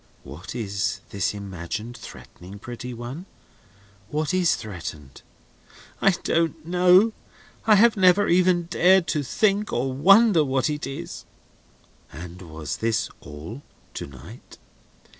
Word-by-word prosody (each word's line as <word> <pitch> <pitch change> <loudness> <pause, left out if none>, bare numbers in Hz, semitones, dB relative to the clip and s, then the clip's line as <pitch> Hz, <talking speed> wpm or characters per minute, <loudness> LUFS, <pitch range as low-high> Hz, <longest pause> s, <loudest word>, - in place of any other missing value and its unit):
"What 75 - -9
is 100 -4 -2
this 100 +1 -1
imagined 100 +4 -6
threatening, 100 -4 -12
pretty 120 +3 -8
one? 125 +10 -7 0.8
What 150 +4 -1
is 185 -2 +3
threatened?" 80 - -8 0.8
"I - - +5
don't 165 -1 0
know. 180 +5 +4 0.5
I 215 - +7
have 225 +3 +5
never 190 +1 +4
even 180 0 +3
dared 180 +2 +3
to 150 - 0
think 200 - 0
or 130 +2 -1
wonder 195 - +5
what 135 +2 0
it 150 -1 -4
is." 140 +5 -7 0.9
"And 85 +4 -10
was 80 -5 -6
this 110 -1 -1
all, 75 - -9 0.3
to - - -6
night?" 65 -2 -13
130 Hz, 120 wpm, -24 LUFS, -, 0.9 s, I